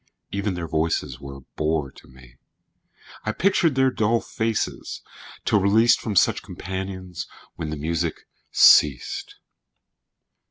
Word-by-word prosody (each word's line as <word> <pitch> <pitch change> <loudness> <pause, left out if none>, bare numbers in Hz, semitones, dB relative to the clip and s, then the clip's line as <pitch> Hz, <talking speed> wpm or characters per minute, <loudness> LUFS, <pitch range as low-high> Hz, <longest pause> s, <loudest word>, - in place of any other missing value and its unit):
Even 100 -1 -2
their 85 -1 -4
voices 80 -5 -1
were 70 -1 -9
a 70 - -11
bore 75 0 -2
to - - -18
me; 65 -1 -18 0.9
I - - -1
pictured 170 -5 +2
their 130 0 +3
dull 115 0 +1
faces, 110 -1 -3 0.4
till 105 - +3
released 110 +5 +4
From 105 -3 -3
such - - +3
companions, 95 -1 -6 0.3
when 80 - -5
the 80 - -3
music 80 +2 -2 0.2
ceased. 70 -5 +4
90 Hz, 125 wpm, -23 LUFS, 75-105 Hz, 0.9 s, released